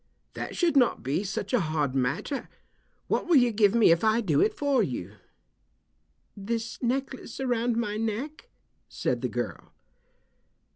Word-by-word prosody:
"That - - -5
should 340 -4 +1
not 255 -3 +3
be 140 +9 -1
such 195 +3 -4
a 250 - +4
hard 155 -6 -1
matter. 135 - -2 0.6
What - - -1
will 345 - +4
you 245 -3 +5
give 210 -1 +3
me 225 -7 +6
if 165 0 +3
I 220 +1 +3
do 165 -11 +2
it 220 - +3
for 280 -4 +2
you?" 120 - -3 1.2
"This 230 +3 -4
necklace 265 0 -3
around 240 -3 0
my 210 -3 -1
neck," 225 +8 -4 0.4
said - - -2
the - - -1
girl. - - -5
225 Hz, 150 wpm, -27 LUFS, 190-250 Hz, 1.2 s, me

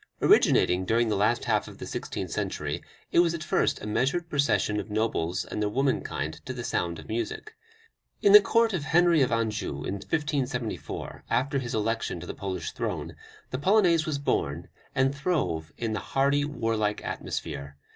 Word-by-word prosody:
Originating 90 +1 +4
during 115 +4 +2
the 105 - +1
last 105 +4 +1
half - - +1
of - - -11
the - - -7
sixteenth - - -5
century, - - -2 0.3
it - - +4
was 170 -1 +4
at 160 - -5
first - - +1
a - - -4
measured 135 +10 0
procession 140 -8 +1
of - - -6
nobles 95 -5 -1
and 105 - -4
their 105 - +1
womankind 105 - -1
to 130 - -5
the 120 -1 -6
sound 85 -8 -1
of - - -11
music. 115 - -4 0.7
In 200 - +4
the 210 - +12
court 230 +2 +2
of 175 -6 -1
Henry 170 0 +4
of 130 - +2
Anjou, 110 -11 -1
in - - -2
1574, 135 -1 -3
after 140 +2 +1
his 120 -3 -4
election 110 -4 -1
to 90 - -8
the - - -5
Polish 95 -2 -4
throne, - - -4 0.4
the 130 - -2
Polonaise 175 -2 +4
was 150 -2 0
born, 85 - -1 0.3
and 130 +1 +3
throve 135 - -1
in 115 -2 -2
the 110 - -1
hardy, 140 +1 +1
warlike 115 -7 -1
atmosphere. 70 -2 -5
120 Hz, 175 wpm, -27 LUFS, 105-145 Hz, 0.7 s, the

